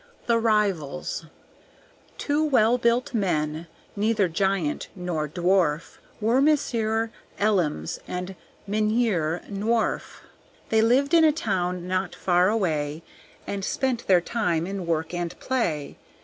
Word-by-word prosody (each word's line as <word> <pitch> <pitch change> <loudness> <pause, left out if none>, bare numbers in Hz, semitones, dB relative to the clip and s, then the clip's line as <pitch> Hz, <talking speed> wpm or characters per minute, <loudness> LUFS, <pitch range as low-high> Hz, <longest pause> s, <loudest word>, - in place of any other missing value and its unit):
The 235 -1 +3
Rivals 195 -8 0 0.9
Two 295 +1 0
well 250 -5 +3
built 235 +2 +1
men, 160 -6 -1 0.3
neither 210 -1 +2
giant 180 -2 -1
nor 175 -4 -2
dwarf, 175 -2 +1 0.2
Were 230 +5 +2
Monsieur 230 -7 +1 0.3
Elims 175 - 0
and 180 +1 -4 0.3
Mynheer 210 -6 0
Nworf. 215 +3 -1 0.5
They 220 0 +4
lived 260 +7 +3
in 330 -1 +7
a 310 - +6
town 180 - -2
not 185 0 -1
far 180 +1 +3
away, 160 -7 -1 0.4
And 200 -1 -4
spent 250 +2 -1
their 180 -2 +5
time 175 -6 -1
in 190 -2 -5
work 160 0 -1
and 175 -1 -4
play. 170 - -2
195 Hz, 120 wpm, -25 LUFS, 170-230 Hz, 0.9 s, in